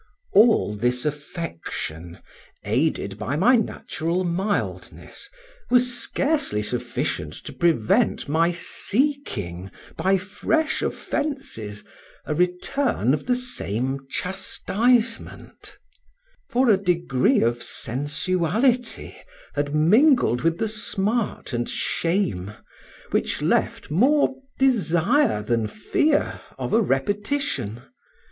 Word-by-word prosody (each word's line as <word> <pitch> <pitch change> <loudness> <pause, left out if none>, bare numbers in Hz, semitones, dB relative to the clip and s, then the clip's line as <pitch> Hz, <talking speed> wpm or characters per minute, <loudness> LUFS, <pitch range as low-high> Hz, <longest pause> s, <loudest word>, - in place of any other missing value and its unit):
All 215 - +5
this 125 +5 0
affection, 115 - -5 0.5
aided - - 0
by 140 - -2
my 225 - +5
natural 180 -5 -1
mildness, 195 - -3 0.4
was 250 0 +3
scarcely 280 - 0
sufficient 120 +2 -2
to - - -8
prevent 185 +6 +2
my 165 +4 +2
seeking, 170 - -2 0.3
by 195 +1 +3
fresh 305 - -1
offences, 270 - -3 0.4
a - - -1
return 180 - +1
of 150 - -2
the 250 - +3
same 135 - -3
chastisement; 230 - -1 0.7
for 250 -1 +3
a 200 - +5
degree 170 -8 +2
of 120 +1 +1
sensuality 185 - -1 0.4
had 145 0 -1
mingled 205 - +4
with 165 +4 +1
the 220 - 0
smart 215 - -2
and 120 0 -1
shame, 165 - -1 0.6
which - - 0
left - - 0
more 270 - +3 0.2
desire 230 - +2
than 115 0 0
fear 290 - 0 0.2
of - - -3
a 230 - +5
repetition. 195 - -1
180 Hz, 95 wpm, -24 LUFS, -, 0.7 s, All